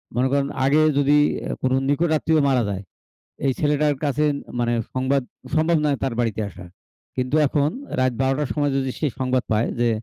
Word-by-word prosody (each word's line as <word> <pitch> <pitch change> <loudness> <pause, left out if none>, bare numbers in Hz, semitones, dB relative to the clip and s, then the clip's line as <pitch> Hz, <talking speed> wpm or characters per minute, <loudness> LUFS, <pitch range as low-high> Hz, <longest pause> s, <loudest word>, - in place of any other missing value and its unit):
মনে 125 +2 +2
করেন 140 0 +1 0.2
আগে 150 +3 +4 0.2
যদি 145 +1 +4 0.3
অ্যা - - -3
কোন 130 - +1 0.2
নিকট 165 +4 +2
আত্মীয় 160 +1 +2
মারা 125 -3 +2
যায়, 100 -1 -4 0.6
এই 135 - +3
ছেলেটার 150 -1 +1
কাছে 145 +1 +1 0.4
মানে 120 0 +1 0.2
সংবাদ 130 +2 +1 0.3
সম্ভব 160 +1 +3
নয় 145 -2 +2
তার 135 -3 -1
বাড়িতে 115 -3 -1
আসা। 100 -2 -11 0.5
কিন্তু 130 +3 0
এখন 145 +1 +1 0.3
রাইত 130 -1 +2
১২ঃ০০ 135 0 +2
টার 150 -3 -1
সময় 145 -2 0
যদি 135 -1 -1
সে 155 - 0
সংবাদ 130 -1 +1
পায়, 110 +2 +1
যে 120 - +3
135 Hz, 185 wpm, -22 LUFS, 130-150 Hz, 0.6 s, আগে